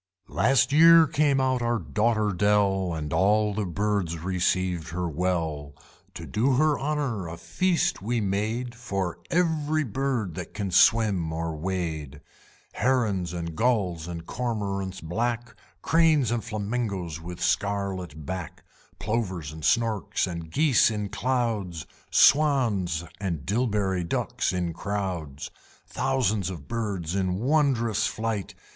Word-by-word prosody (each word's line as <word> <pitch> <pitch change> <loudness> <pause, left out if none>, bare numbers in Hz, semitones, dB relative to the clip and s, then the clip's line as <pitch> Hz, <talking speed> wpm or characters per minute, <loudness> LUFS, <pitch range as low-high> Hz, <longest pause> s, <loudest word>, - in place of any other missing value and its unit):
Last 130 +2 +3
year 165 +1 +8
came 145 -2 +2
out 130 -1 +1
our 120 0 +1
Daughter 110 +2 0
Dell, 100 -1 +2
And 75 -2 -4
all 105 +2 +3
the 105 -1 -2
Birds 100 -2 -1
received 90 -1 -1
her 90 +2 -2
well. 80 -4 -2 0.4
To - - -7
do 125 +6 +1
her 150 +2 +2
honor 135 - -2
a 80 +1 -7
feast 165 - 0
we 115 +4 -1
made 110 +5 -1
For 100 -7 -3
every 155 -3 +1
bird 125 - -2
that 90 -1 -7
can 100 -3 -3
swim 95 -4 +4
or 80 0 -3
wade, 80 -4 -4 0.5
Herons 110 -10 +1
and 85 -2 -5
Gulls, 95 -8 0
and 85 -1 -6
Cormorants 100 -5 -3
black, 120 +7 -2 0.3
Cranes, 160 -7 +3
and 120 -2 -1
Flamingoes 100 -6 -3
with 85 +1 -8
scarlet 95 -6 -1
back, 90 -2 -6 0.3
Plovers 95 -9 -2
and 80 0 -10
Storks, 110 0 +1
and 85 -3 -6
Geese 145 - +4
in 105 -2 -3
clouds, 110 -10 -1 0.2
Swans 115 - +3 0.2
and 85 -8 -3
Dilberry 100 -4 0
Ducks 85 - -1
in 90 -2 -2
crowds: 90 -8 -4 0.3
Thousands 110 -8 0
of 85 -7 -8
Birds 100 -8 -3
in 95 -2 0
wondrous 115 -3 +1
flight! 110 -3 -3
100 Hz, 125 wpm, -26 LUFS, 90-120 Hz, 0.5 s, year